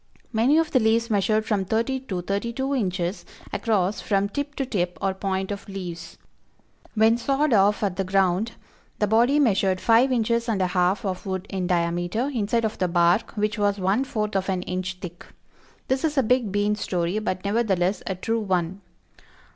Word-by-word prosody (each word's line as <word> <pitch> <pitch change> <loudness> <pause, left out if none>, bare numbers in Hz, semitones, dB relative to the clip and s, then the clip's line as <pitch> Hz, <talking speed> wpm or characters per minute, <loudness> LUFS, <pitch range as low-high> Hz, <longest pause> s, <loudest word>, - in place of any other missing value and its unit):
Many 240 +7 +3
of 325 -1 +1
the 255 - +4
leaves 230 +1 +2
measured 215 +1 +2
from 210 -4 0
thirty 230 +7 0
to 195 -9 -5
thirty 200 +5 -2
two 265 +3 -2
inches 185 -6 -1 0.3
across 205 -3 0
from 200 -1 0
tip 285 +5 -4
to 270 - -1
tip 180 -7 -2
or 195 -1 0
point 190 0 -2
of 200 0 -6
leaves. 180 -3 -7 0.8
When 225 +2 +4
sawed 275 +3 +1
off 205 +1 +3
at 190 -3 -1
the 195 - 0
ground, 190 +3 +1 0.4
the 210 - +2
body 235 +7 +3
measured 195 -7 +2
five 235 +5 +4
inches 235 0 +1
and 210 -4 0
a 185 - +2
half 185 +4 +1
of 190 +1 -4
wood 190 0 -3
in 185 -2 -2
diameter, 175 +9 0
inside 230 0 0
of 220 - -3
the 185 - +2
bark, 175 +3 +2
which 210 +1 -1
was 205 0 +2
one 195 +7 +1
fourth 215 -5 -3
of 195 0 0
an 185 -1 -1
inch 185 0 -3
thick. 180 -3 -8 0.6
This 260 0 0
is 305 -2 0
a 270 - +4
big 240 -2 +1
bean 205 +1 +1
story 180 -1 -1
but 185 -3 -3
nevertheless 200 -3 +1
a 190 - -1
true 225 +5 -1
one. 190 -2 -1
205 Hz, 185 wpm, -24 LUFS, 185-230 Hz, 0.8 s, the